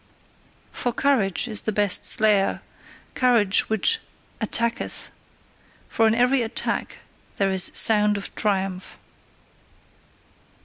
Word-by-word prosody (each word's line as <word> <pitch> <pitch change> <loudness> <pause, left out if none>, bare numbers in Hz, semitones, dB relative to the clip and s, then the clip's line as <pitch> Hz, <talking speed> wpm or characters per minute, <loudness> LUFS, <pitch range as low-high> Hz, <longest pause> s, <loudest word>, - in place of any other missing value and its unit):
For 245 - -3
courage 245 -7 0
is 215 -3 -1
the 220 - -3
best 205 -2 +1
slayer, 210 -3 +2 0.5
courage 235 -6 +2
which 220 - +1 0.4
ATTACKETH: 230 +1 -1 0.8
for 225 - +1
in 220 - +1
every 250 +2 +2
attack 225 -1 -3 0.4
there 195 -1 0
is 190 -1 +4
sound 210 -1 +4
of 200 - -7
triumph. 195 -2 -3
215 Hz, 100 wpm, -22 LUFS, 195-235 Hz, 0.8 s, is